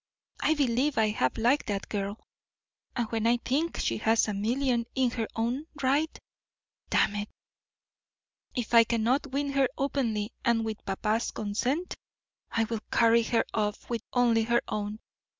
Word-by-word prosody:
I 315 - +2
believe 275 0 +1
I 220 -1 +4
half 130 -12 0
like 245 +6 +2
that 200 -2 -2
girl, 200 +1 -3 0.8
and 240 -3 0
when 225 0 +1
I 240 +1 +4
think 290 +7 -1
she - - -1
has 225 +1 +3
a 210 - -1
million 235 +3 0
in 260 -3 +2
her 225 -2 -2
own 245 +7 -1
right 280 +4 +1 0.7
Damn - - +3
it, 205 0 -4 1.3
if 240 -2 -3
I 230 -1 +9
cannot 235 +5 +1
win 280 +1 -2
her 275 -1 +3
openly 235 -6 -1
and 235 -3 +2
with 220 -1 -5
papa's 215 +4 0
consent, 245 - -2 0.6
I 225 - +1
will 225 -1 -3
carry 230 0 +5
her 230 0 +1
off 210 +1 -2
with 230 -2 -1
only 240 -2 +3
her 235 +1 +2
own. 210 0 -3
235 Hz, 155 wpm, -28 LUFS, 220-260 Hz, 1.3 s, I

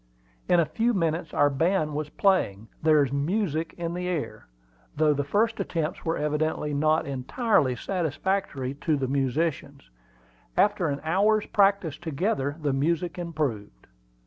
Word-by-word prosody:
In 175 - +5
a 165 - +4
few 230 +7 0
minutes 165 -2 -1
our 145 0 +3
band 155 +2 +1
was 150 0 -3
playing 115 - +1
"There's 150 -4 +4
music 160 +2 -1
in 170 -1 -3
the 180 +1 -3
air," 150 -11 -4 0.5
though 155 0 +3
the 145 0 -1
first 215 +10 +1
attempts 165 -4 -2
were 165 0 -1
evidently 150 0 -1
not 155 +2 +2
entirely 140 - +1
satisfactory 165 -3 -2
to 155 -3 +1
the 135 -1 -1
musicians. 140 - -2 0.7
After 205 -4 +3
an 140 -1 -2
hour's 205 +6 +2
practice 195 -6 +2
together 150 -3 -1
the 145 -2 +1
music 170 +6 -1
improved. 140 - -4
155 Hz, 140 wpm, -26 LUFS, 140-180 Hz, 0.7 s, In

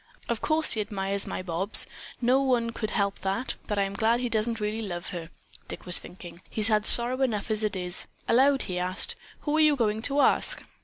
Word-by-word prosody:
"Of 235 -2 -3
course 310 0 +3
he 220 - +2
admires 200 -1 -3
my - - -5
Bobs; 185 +3 +1 0.3
no 255 +2 +2
one 245 -4 0
could 220 -1 -4
help 200 -2 -1
that, 195 +7 -2
but 210 - -3
I'm 195 0 -1
glad 220 +3 +1
that 240 - -3
he 245 - -2
doesn't 225 +1 -1
really 210 +1 -3
love 180 -5 -5
her," 170 -3 -7 0.4
Dick - - -9
was 180 -1 +3
thinking. 175 -1 -12
"He's 215 0 +1
had 215 0 +3
sorrow 245 +2 +6
enough 220 -5 -1
as 215 0 +1
it 210 -2 -1
is." 180 -1 -4 0.2
Aloud 270 +3 +3
he 180 -1 -4
asked, 180 +1 +1 0.3
"Who 295 0 -2
are - - +2
you 305 -2 +4
going 220 -4 -1
to 280 +4 0
ask?" - - +3
215 Hz, 215 wpm, -26 LUFS, 195-240 Hz, 0.4 s, sorrow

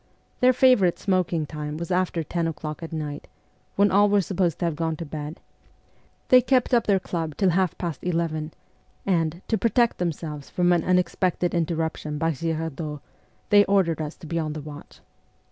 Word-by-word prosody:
Their 250 0 +6
favourite 250 -9 +4
smoking 180 -5 0
time 150 0 -5
was 170 +3 -5
after 180 -2 0
ten 165 +2 -2
o'clock 155 0 -5
at 165 - -7
night, 150 -2 -5 0.5
when 200 0 +4
all 205 +2 +5
were 205 0 +4
supposed 180 -3 0
to - - -2
have 165 -3 -1
gone 160 0 -1
to 165 - -6
bed; 150 +1 -6 0.9
they 255 0 +8
kept 255 +1 +1
up 235 -2 +3
their* 200 -2 +4
club 165 -5 -4
till 190 -3 +3
half 185 -1 +1
past 170 -6 -4
eleven, 165 -3 -1 0.5
and, 170 -2 0
to 220 - 0
protect 235 0 +2
themselves 155 -4 -4
from 175 0 +2
an 170 -2 +1
unexpected 180 -1 +1
interruption 160 -2 -2
by 165 +2 +1
Girardot, 160 -1 -3 0.5
they 205 0 +8
ordered 185 -5 +2
us 150 0 -5
to - - -12
be 165 +2 -2
on 155 -2 -2
the 155 - -6
watch. 145 0 -11
170 Hz, 180 wpm, -25 LUFS, 155-185 Hz, 0.9 s, they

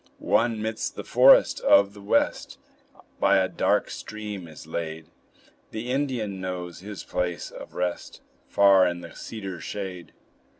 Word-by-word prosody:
One, 115 -1 +1
midst 110 0 -3
the - - -6
forest - - +6
of 100 0 +4
the 100 - -13
West, 105 +3 0 0.6
By - - +4
a - - +2
dark - - 0
stream 105 -4 -7
is 80 -1 -12
laid; 80 0 -5 0.6
The 115 +3 -5
Indian 125 -8 -2
knows 90 -2 -5
his 100 +1 -8
place 90 -1 -3
of - - -11
rest, 90 -1 -3 0.3
Far 100 -2 +5
in 85 0 -3
the 85 -1 -10
cedar 100 -5 -7
shade. 95 -4 -6
95 Hz, 140 wpm, -25 LUFS, 90-110 Hz, 0.6 s, forest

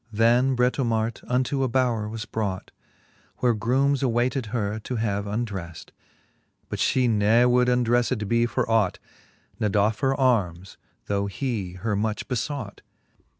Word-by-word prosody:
Then 120 +4 +3
Britomart 120 -2 0
unto 130 +2 0
a 130 - +2
bowre 115 -4 0
was 110 0 -5
brought; 100 -5 -4 0.7
Where 125 -2 +2
groomes 130 +6 +1
awayted 125 0 0
her 105 -2 -2
to 125 +4 -5
have 105 -3 -1
undreft. 100 -6 -5 0.8
But - - -4
ftie 130 -2 +2
ne 110 +2 +4
would 125 0 +3
undrelfed 120 -2 +1
be 115 +2 +2
for - - -1
ought, 110 -5 +2 0.6
Ne 105 -2 +1
doffe 105 +1 +1
her 135 0 0
armes, 95 -8 0 0.3
though 100 0 -1
he 105 -5 -3
her 105 +3 -2
much 105 +1 -2
befeught. 125 -3 -4
115 Hz, 140 wpm, -25 LUFS, 105-125 Hz, 0.8 s, ne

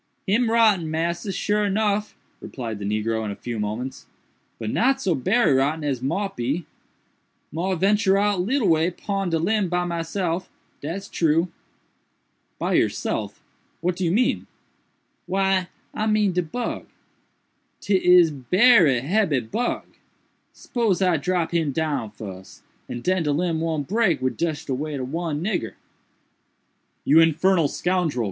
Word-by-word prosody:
"Him 225 +4 +2
rotten, 215 -8 +3
massa, 170 +5 -2
sure 210 +1 0
nuff," 210 +1 0 0.2
replied 115 -5 -6
the 100 - -5
negro 110 +2 -1
in 105 - -3
a 100 - -4
few 120 0 -5
moments, 110 +6 -4 0.5
"but 110 -1 -4
not 270 +3 +2
so 190 -9 +1
berry 190 - +2
rotten 145 +4 +1
as 135 -4 -1
mought 190 +10 -2
be. 140 +8 -2 0.9
Mought 175 +2 -2
ventur 195 0 +3
out 205 -2 +1
leetle 235 +3 +1
way 165 0 +3
pon 195 +1 -3
de 165 - +1
limb 195 +3 +1
by 180 0 0
myself, 170 +1 -2 0.3
dat's 180 +7 -5
true." 165 +2 +1 1.1
"By - - -1
yourself!—what 175 +1 -2
do 185 - -3
you 165 - +1
mean?" 240 +7 +1 0.8
"Why 190 -1 +1 0.3
I 215 - -1
mean 215 -2 +2
de 180 0 +1
bug. 230 +9 -4 0.9
'Tis 180 -4 +4
berry 160 - +4
hebby 160 -3 +1
bug. 245 +1 -1 0.7
Spose 220 -6 -1
I 180 -3 +3
drop 175 +2 -1
him 160 -4 +1
down 150 -7 -1
fuss, 95 -3 -10 0.3
and 120 0 -5
den 185 0 +1
de 150 -2 0
limb 165 +1 0
won't 160 -4 -2
break 215 -4 +2
wid 130 0 -2
just 160 -2 -2
de 135 - -2
weight 145 +2 -3
ob 130 0 -5
one 165 -2 -2
nigger." 190 -2 -2 1.3
"You 155 +3 +6
infernal 165 +1 +3
scoundrel!" 175 -3 -1
170 Hz, 145 wpm, -23 LUFS, 145-195 Hz, 1.3 s, You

